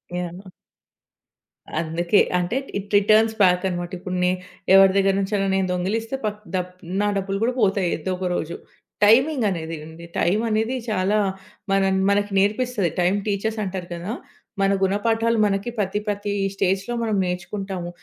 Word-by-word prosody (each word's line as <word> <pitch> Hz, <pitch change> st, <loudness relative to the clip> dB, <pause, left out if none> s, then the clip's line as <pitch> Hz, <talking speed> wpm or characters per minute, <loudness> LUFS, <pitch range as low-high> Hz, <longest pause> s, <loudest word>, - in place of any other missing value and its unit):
Yeah! 180 Hz, +2 st, -5 dB, 1.4 s
అందుకే 170 Hz, +4 st, +1 dB, 0.2 s
అంటే, 180 Hz, +8 st, -1 dB, 0.2 s
it 205 Hz, +1 st, -7 dB
returns 215 Hz, +2 st, +4 dB
back 180 Hz, -1 st, +4 dB
అన్నమాట. 175 Hz, -1 st, -3 dB
ఇప్పుడునే 180 Hz, 0 st, 0 dB, 0.4 s
ఎవరి 195 Hz, 0 st, +8 dB
దగ్గర 195 Hz, 0 st, +3 dB
నుంచైనా 195 Hz, 0 st, 0 dB
నేను 190 Hz, -1 st, +1 dB
దొంగిలిస్తే 220 Hz, +7 st, -2 dB
పప్ 210 Hz, 0 st, -3 dB
డప్ 180 Hz, 0 st, -2 dB, 0.3 s
నా 205 Hz, -, +2 dB
డబ్బులు 195 Hz, 0 st, -2 dB
కూడా 250 Hz, -, +1 dB
పోతాయి 195 Hz, -3 st, +2 dB
ఏదో 175 Hz, +4 st, -4 dB
ఒక 185 Hz, -, -4 dB
రోజు. 170 Hz, 0 st, -3 dB, 0.5 s
టైమింగ్ 255 Hz, +4 st, +5 dB
అనేది 165 Hz, -2 st, -4 dB
అండి. 160 Hz, +2 st, -11 dB
టైమ్ 195 Hz, +6 st, +2 dB
అనేది 220 Hz, +4 st, 0 dB
చాలా 205 Hz, 0 st, +1 dB, 0.5 s
మనని 195 Hz, -1 st, +2 dB
మనకి 205 Hz, 0 st, +1 dB
నేర్పిస్తది. 210 Hz, -1 st, +1 dB
టైమ్ 185 Hz, +3 st, +2 dB
టీచేస్ 215 Hz, +2 st, -1 dB
అంటారు 185 Hz, -2 st, -4 dB
కదా! 175 Hz, +6 st, -4 dB, 0.5 s
మన 195 Hz, -, +3 dB
గుణపాఠాలు 225 Hz, +4 st, +1 dB
మనకి 200 Hz, +2 st, -1 dB
ప్రతి 200 Hz, +1 st, 0 dB
ప్రతి 205 Hz, 0 st, -2 dB, 0.2 s
స్టేజ్‍లో 195 Hz, +4 st, 0 dB
మనం 220 Hz, -2 st, 0 dB
నేర్చుకుంటాము. 180 Hz, 0 st, -4 dB
195 Hz, 145 wpm, -23 LUFS, 180-210 Hz, 1.4 s, ఎవరి